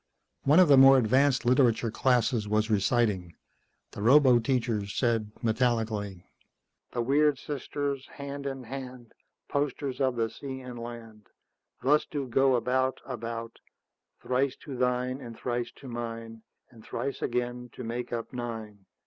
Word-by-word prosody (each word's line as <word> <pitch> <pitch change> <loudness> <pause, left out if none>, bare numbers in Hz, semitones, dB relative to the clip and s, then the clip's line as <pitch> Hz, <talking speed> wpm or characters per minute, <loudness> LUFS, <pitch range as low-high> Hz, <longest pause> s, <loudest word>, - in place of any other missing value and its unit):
One 150 +5 +6
of 185 - +7
the 140 -2 +7
more 135 0 +9
advanced 130 +2 +3
literature 120 -2 +3
classes 120 -2 +1
was 110 +1 +1
reciting. 100 -4 +1 0.6
The - - -8
roboteacher 120 -4 +4
said 115 0 0
metallically, 110 -5 0 0.7
"_The 120 -1 -2
weird 145 +2 +3
sisters, 140 -1 -4
hand 140 0 -6
in 135 -1 -5
hand, 125 -1 -8 0.3
Posters 140 -1 -2
of 130 -2 +2
the 115 -1 -1
sea 135 -2 -7
and 125 -2 -8
land, 115 -3 -9 0.6
Thus 150 +3 +4
do 140 -3 -3
go 135 +2 +3
about, 130 +2 0
about: 115 -2 -6 0.6
Thrice 130 +1 0
to 140 - -7
thine, 125 +1 0
and 115 -3 -9
thrice 120 -1 -3
to 135 - -12
mine, 115 -1 -6 0.3
And 115 -3 -16
thrice 135 +4 -4
again, 125 0 -2
to 125 - -8
make 120 +1 -4
up 115 0 -4
nine. 110 -5 -6
125 Hz, 140 wpm, -28 LUFS, 115-135 Hz, 0.7 s, more